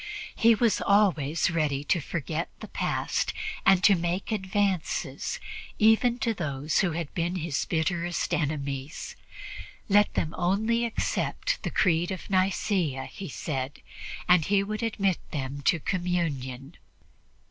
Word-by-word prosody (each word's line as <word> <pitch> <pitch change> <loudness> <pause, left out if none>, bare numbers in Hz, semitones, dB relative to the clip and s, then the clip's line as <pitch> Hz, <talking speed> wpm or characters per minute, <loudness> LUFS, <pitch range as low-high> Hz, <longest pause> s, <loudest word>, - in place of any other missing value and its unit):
He 230 -1 +5
was 230 0 +2
always 180 -6 +3
ready 150 -4 0
to 165 +3 +1
forget 160 +2 -3
the - - -8
past - - -1 0.3
and 190 -1 +6
to 205 - +7
make 175 +3 -1
advances 195 -4 -1 0.4
even 225 +3 +4
to 235 -2 0
those 145 -5 -1
who 175 -4 +1
had 165 -2 -4
been 175 0 -1
his 165 -5 -1
bitterest 170 +1 -1
enemies. 140 -1 -3 0.7
Let 205 +1 +5
them 160 - -1
only 220 +6 +1
accept 230 - -1
the - - -2
Creed 170 -1 +2
of 190 +1 -6
Nicea, 185 -7 +1
he 195 - -7
said, 130 +3 -4 0.5
and 180 -2 +6
he 195 +4 +2
would 215 +2 -4
admit 200 -5 0
them 140 -1 -4
to 170 - +4
communion. 155 -6 -2
175 Hz, 130 wpm, -27 LUFS, 150-200 Hz, 0.7 s, to